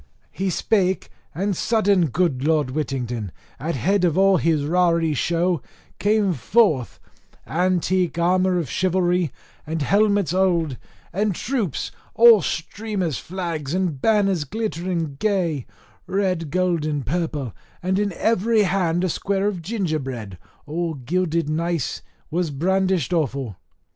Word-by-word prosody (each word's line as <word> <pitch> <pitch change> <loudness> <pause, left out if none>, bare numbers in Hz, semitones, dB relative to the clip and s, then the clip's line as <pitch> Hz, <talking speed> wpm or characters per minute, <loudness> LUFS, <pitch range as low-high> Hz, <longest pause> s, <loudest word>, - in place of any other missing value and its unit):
He 195 0 -2
spake, 190 +1 0 0.2
and 195 +2 0
sudden 205 -4 +2
good 145 -3 0
Lord 150 -4 +2
Whittington, 125 - -3 0.3
at 155 +5 -2
head 190 - +1
of 175 -1 +2
all 195 0 +5
his 160 -4 +1
raree 170 -1 +2
show, 170 +2 0 0.4
came 205 -2 +2
forth, 160 - +2 0.5
armour 165 +4 -2
antique 180 -1 +1
of 180 -1 +2
chivalry, 180 -1 +1 0.4
and 160 -1 -2
helmets 200 -1 +2
old, 170 -7 +1 0.4
and 205 0 0
troops, 225 - -2 0.2
all 230 -3 +8
streamers, 185 - -3
flags 170 -5 -4
and 175 -8 -1
banners 195 -6 +2
glittering 170 -5 -3
gay, 180 - 0 0.4
red, 185 -5 0
gold, 180 -1 +1
and 145 -4 -2
purple; 145 - -2 0.3
and 190 +2 +1
in 205 -1 0
every 225 +2 +2
hand 175 -2 +1
a - - +2
square 195 +4 0
of 195 -4 -2
gingerbread, 145 - -3 0.3
all 165 +2 -2
gilded 165 +4 -1
nice, 165 -1 -1 0.3
was 175 0 0
brandished 185 +2 +1
awful. 135 - -1
175 Hz, 125 wpm, -22 LUFS, 155-190 Hz, 0.5 s, all